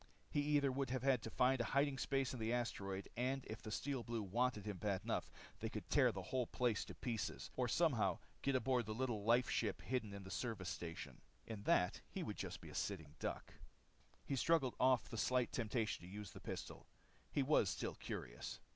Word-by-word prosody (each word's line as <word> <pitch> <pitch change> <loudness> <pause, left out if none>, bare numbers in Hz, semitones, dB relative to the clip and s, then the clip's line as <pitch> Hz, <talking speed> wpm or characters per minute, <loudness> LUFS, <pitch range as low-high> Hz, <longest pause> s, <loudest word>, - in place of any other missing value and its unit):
He 145 - +2
either 145 -2 +3
would 135 0 -1
have 130 -1 +2
to 115 - -5
find 125 +2 +3
a 120 +4 0
hiding 140 -1 +3
place 135 -2 +1
on 125 - -5
the 110 +1 0
asteroid, 100 -5 -1
and 130 +2 0
if 110 - -6
the - - -6
Steel 135 +4 -1
Blues 115 -4 -3
wanted 120 -2 +2
him 105 -3 -3
bad 100 -3 0
enough - - -1 0.3
they 110 - -2
could 110 -1 -5
tear 130 -4 +6
the 95 -3 -5
whole 125 +5 0
place 120 -4 +1
to - - -8
pieces, 115 -4 -3
or 125 -1 +1
somehow 120 - +3 0.2
get 140 -1 +2
aboard 125 -2 +2
the 110 - -2
little 120 -4 -1
life 120 +3 +5
ship - - 0
hidden 125 -5 -1
in 100 0 -6
the 95 - -8
service 110 -7 -2
station. 85 -1 -5 0.2
In 110 -3 -5
that 90 - +3
he - - -3
would - - -4
be - - -2
just - - -5
a - - -8
sitting 80 -7 -2
duck. - - -3 0.7
He 140 - 0
shrugged 135 -2 +3
off 130 -1 +5
the 115 - -6
slight 125 +3 +2
temptation 115 -1 0
to 90 - -9
use 105 -3 -6
the - - -10
pistol. - - -6 0.4
He - - +2
was - - +4
still - - -2
curious. - - -5
120 Hz, 210 wpm, -41 LUFS, 105-130 Hz, 0.7 s, tear